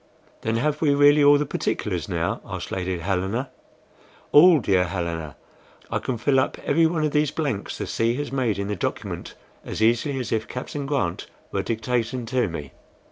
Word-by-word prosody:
"Then 110 +1 -1
have 150 +5 0
we 145 -3 +3
really 145 +1 +6
all 145 0 +7
the 150 - 0
particulars - - -2
now?" - - -1
asked - - -6
Lady 95 -1 -2
Helena. 95 - -2 0.8
"All, 165 +2 +8
dear 95 -6 +2
Helena; 85 -4 -4 0.6
I - - 0
can 130 - -3
fill 135 +4 +2
up 130 - 0
every 165 +3 +4
one 160 -1 -1
of 150 - +1
these 150 -1 +2
blanks 140 -10 -3
the - - -3
sea 115 +1 0
has 145 0 -4
made 125 -7 0
in 100 0 -2
the 105 - -2
document - - -4 0.3
as - - -5
easily 120 +5 +2
as 120 -5 -4
if 110 -1 -1
Captain 140 +2 -5
Grant 130 -12 -1 0.2
were 100 - 0
dictating 115 +3 -2
to 125 0 +1
me." 75 -6 -6
120 Hz, 185 wpm, -24 LUFS, 100-145 Hz, 0.8 s, All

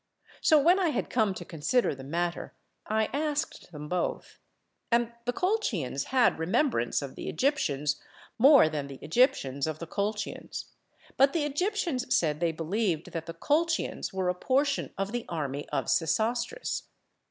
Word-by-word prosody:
So 310 - +6
when 345 +6 +5
I 360 -3 +2
had - - -2
come 215 -5 +2
to - - -7
consider 170 +10 +1
the 135 -1 -9
matter 170 +5 -3 0.3
I 220 0 +2
asked 300 - -2
them 150 -2 -7
both; 180 +2 -3 0.5
and 235 0 +2
the 245 - +1
Colchians 245 - -1
had 255 -9 +3
remembrance 190 - +1
of - - -6
the - - -6
Egyptians 150 - 0 0.4
more 275 - +8
than 150 -3 -3
the 135 -1 -9
Egyptians 145 - +2
of 155 -1 -3
the 170 - -6
Colchians; 205 +4 -4 0.5
but 275 +1 +5
the 330 - +1
Egyptians 295 -4 0
said 150 -3 +1
they 170 -1 +1
believed 165 +1 -1
that 165 -1 -5
the 165 - -6
Colchians 320 - 0
were 190 -1 -1
a 180 - +2
portion 275 +8 0
of 195 +1 -2
the 240 0 -4
army 145 -4 -3
of - - -1
Sesostris. 225 - 0
210 Hz, 155 wpm, -29 LUFS, -, 0.5 s, more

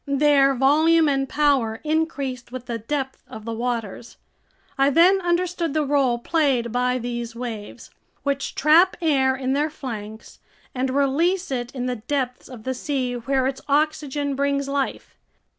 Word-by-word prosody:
Their 280 -1 +4
volume 310 +5 +4
and 270 -2 0
power 270 -7 +1
increased 290 -6 -2
with 255 -1 -7
the 235 -2 -4
depth 265 +3 -4
of 220 -1 -10
the 230 - -3
waters. 230 -1 -4 0.6
I 275 0 +3
then 360 +6 +5
understood 345 -2 -1
the 305 -1 +1
role 275 -4 +2
played 255 -4 0
by 250 +1 +1
these 240 -1 -5
waves, 230 -4 -7 0.3
which 280 -1 -2
trap 320 +6 +5
air 270 -6 +2
in 260 0 -1
their 295 +3 +1
flanks 220 -7 -8 0.3
and 260 +1 -1
release 285 +7 +1
it 245 -1 -3
in 250 -1 -3
the 250 -1 -2
depths 250 +2 -3
of 245 -4 -10
the 260 - -2
sea 255 -1 -2
where 260 +2 0
its 265 0 -2
oxygen 290 -1 0
brings 280 0 0
life. 275 -1 -3
270 Hz, 155 wpm, -23 LUFS, 245-295 Hz, 0.6 s, then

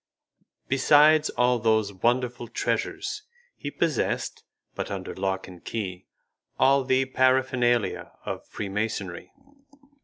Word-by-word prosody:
Besides 150 +3 +5
all 125 0 +2
those 110 -2 +2
wonderful 120 +4 0
treasures, 420 - -2 0.3
he 145 - -5
possessed, 155 -2 -1 0.3
but - - -4
under - - -5
lock 95 0 -2
and 90 -2 -13
key, 95 -5 -5 0.5
all 135 +1 +4
the 130 0 +2
paraphernalia 130 -3 +1
of - - -4
freemasonry. 100 -3 -4
120 Hz, 100 wpm, -26 LUFS, 105-130 Hz, 0.5 s, Besides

